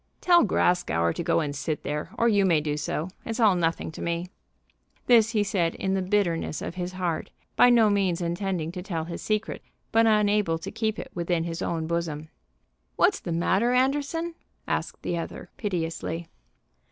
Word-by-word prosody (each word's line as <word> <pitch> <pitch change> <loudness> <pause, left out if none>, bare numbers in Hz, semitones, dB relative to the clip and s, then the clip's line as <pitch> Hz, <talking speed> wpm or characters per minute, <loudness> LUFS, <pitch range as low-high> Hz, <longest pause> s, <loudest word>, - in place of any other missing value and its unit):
"Tell 350 -1 +5
Grascour 85 - +2
to - - -4
go - - +2
and 145 -2 -3
sit 150 +1 -3
there, 150 +1 -3
or 235 - +3
you 205 -3 +4
may 170 -5 +4
do 150 -1 -2
so. 150 +3 -3
It's 225 +1 -4
all 215 -4 +6
nothing 165 -2 -1
to - - -9
me." 170 +1 -2 0.8
This 230 -3 +5
he 210 -2 +3
said 180 -5 0
in 190 - -1
the 190 - +1
bitterness 180 -5 0
of - - -5
his 180 0 -4
heart, 180 -3 -2 0.3
by 245 - +7
no 235 -3 +6
means 190 -4 +1
intending 175 -1 -2
to 180 0 -6
tell 170 -4 -3
his 170 0 -6
secret, 215 0 -2 0.3
but 225 0 +4
unable 210 -5 +3
to 165 - -7
keep 220 -1 -1
it - - -7
within 170 -2 -1
his 165 0 -4
own 165 -1 -2
bosom. 160 -2 -3 0.7
"What's - - +3
the 170 - -5
matter, 190 +8 +2
Anderson?" 285 +6 0 0.3
asked - - -3
the 170 -1 -1
other - - -7
piteously. 170 -5 -3
180 Hz, 180 wpm, -26 LUFS, 165-210 Hz, 0.8 s, by